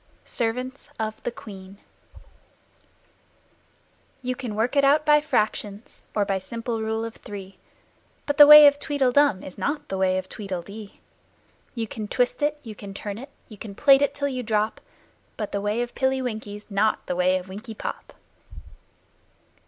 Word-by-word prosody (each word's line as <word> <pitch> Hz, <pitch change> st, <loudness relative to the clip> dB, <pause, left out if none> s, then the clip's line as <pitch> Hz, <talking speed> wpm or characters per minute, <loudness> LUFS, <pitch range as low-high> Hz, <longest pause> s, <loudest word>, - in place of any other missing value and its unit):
Her 230 Hz, -2 st, +2 dB
Majesty's 255 Hz, +3 st, -7 dB
Servants 210 Hz, -3 st, -6 dB, 2.4 s
You 255 Hz, 0 st, -1 dB
can 245 Hz, -6 st, -5 dB
work 225 Hz, +6 st, 0 dB
it 280 Hz, -, +4 dB
out 290 Hz, +2 st, +4 dB
by 295 Hz, 0 st, +5 dB
Fractions 215 Hz, -5 st, -2 dB
or 205 Hz, -1 st, +2 dB
by 195 Hz, -1 st, -1 dB
simple 230 Hz, +3 st, -4 dB
Rule 220 Hz, +1 st, -2 dB
of 230 Hz, -, -8 dB
Three, 195 Hz, -1 st, -10 dB, 0.7 s
But 290 Hz, -, -2 dB
the 295 Hz, -, +11 dB
way 300 Hz, 0 st, +11 dB
of 285 Hz, 0 st, +5 dB
Tweedle 285 Hz, -4 st, +1 dB
dum 285 Hz, -8 st, +3 dB
is 185 Hz, -, -10 dB
not 295 Hz, +1 st, -2 dB
the 190 Hz, -, -3 dB
way 185 Hz, 0 st, +2 dB
of 185 Hz, 0 st, -4 dB
Tweedle 190 Hz, -4 st, -5 dB
dee. 205 Hz, +2 st, -11 dB, 0.8 s
You 230 Hz, -2 st, -2 dB
can 215 Hz, 0 st, -6 dB
twist 245 Hz, +6 st, 0 dB
it, 295 Hz, +1 st, +1 dB
you 225 Hz, -3 st, -8 dB
can 200 Hz, -1 st, -10 dB
turn 205 Hz, +1 st, -5 dB
it, 270 Hz, +3 st, -10 dB, 0.2 s
you 215 Hz, -3 st, -13 dB
can 205 Hz, -3 st, -8 dB
plait 275 Hz, +3 st, +6 dB
it 285 Hz, 0 st, +1 dB
till 285 Hz, 0 st, -1 dB
you 255 Hz, -2 st, -3 dB
drop, 215 Hz, -2 st, -1 dB, 0.6 s
But 210 Hz, -2 st, -4 dB
the 200 Hz, -, -2 dB
way 210 Hz, +4 st, 0 dB
of 240 Hz, -, -8 dB
Pilly 265 Hz, 0 st, +1 dB
Winky's 215 Hz, -4 st, -5 dB
not 210 Hz, +2 st, +1 dB
the 180 Hz, -, -2 dB
way 180 Hz, +1 st, +2 dB
of 185 Hz, 0 st, -8 dB
Winkie 210 Hz, +4 st, -8 dB
Pop! -, -, -7 dB
220 Hz, 170 wpm, -24 LUFS, 200-265 Hz, 2.4 s, the